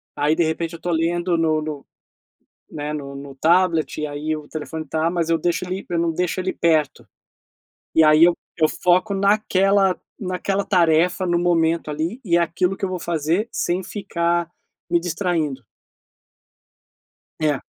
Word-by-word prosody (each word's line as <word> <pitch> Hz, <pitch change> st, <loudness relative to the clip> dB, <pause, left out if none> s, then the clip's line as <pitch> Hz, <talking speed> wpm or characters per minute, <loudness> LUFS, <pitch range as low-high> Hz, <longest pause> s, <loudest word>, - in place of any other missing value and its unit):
aí, 150 Hz, +2 st, +2 dB
de 170 Hz, -, +2 dB
repente, 165 Hz, +1 st, -2 dB
eu -, -, -11 dB
tô 175 Hz, -, -2 dB
lendo 170 Hz, +2 st, 0 dB
no 160 Hz, -1 st, +2 dB
no 150 Hz, -2 st, -6 dB, 0.9 s
né, 150 Hz, 0 st, -4 dB
no 140 Hz, -2 st, -6 dB
no 140 Hz, 0 st, -9 dB
tablet, 165 Hz, 0 st, +2 dB
e -, -, -1 dB
aí 150 Hz, +2 st, -3 dB
o 150 Hz, -, -11 dB
telefone 155 Hz, 0 st, -6 dB
tá, 160 Hz, +3 st, 0 dB
mas 170 Hz, -2 st, -1 dB
eu 165 Hz, -, +3 dB
deixo 175 Hz, +1 st, -1 dB
ele 185 Hz, +2 st, -5 dB
eu 170 Hz, -, -1 dB
não 170 Hz, -1 st, +1 dB
deixo 180 Hz, +2 st, -1 dB
ele 185 Hz, 0 st, -2 dB
perto, 155 Hz, -4 st, +1 dB, 0.9 s
e 160 Hz, -, +6 dB
aí 155 Hz, +1 st, +6 dB
eu 175 Hz, -, +4 dB, 0.2 s
eu 155 Hz, -1 st, +4 dB
foco 185 Hz, +3 st, +2 dB
naquela 195 Hz, -1 st, +2 dB, 0.2 s
naquela 195 Hz, +1 st, -2 dB
tarefa 180 Hz, +1 st, +2 dB
no 175 Hz, -1 st, +1 dB
momento, 165 Hz, -2 st, +1 dB
ali, 165 Hz, -, -3 dB
e 170 Hz, -2 st, +3 dB
aquilo 180 Hz, +3 st, 0 dB
que 195 Hz, -, -2 dB
eu -, -, -3 dB
vou 180 Hz, -1 st, -3 dB
fazer 170 Hz, +7 st, -1 dB
sem 180 Hz, +2 st, -1 dB
ficar 170 Hz, -4 st, -1 dB, 0.4 s
me 170 Hz, -, +4 dB
distraindo. 165 Hz, -, -2 dB, 1.8 s
É. 150 Hz, -3 st, +1 dB
170 Hz, 160 wpm, -22 LUFS, 155-180 Hz, 1.8 s, e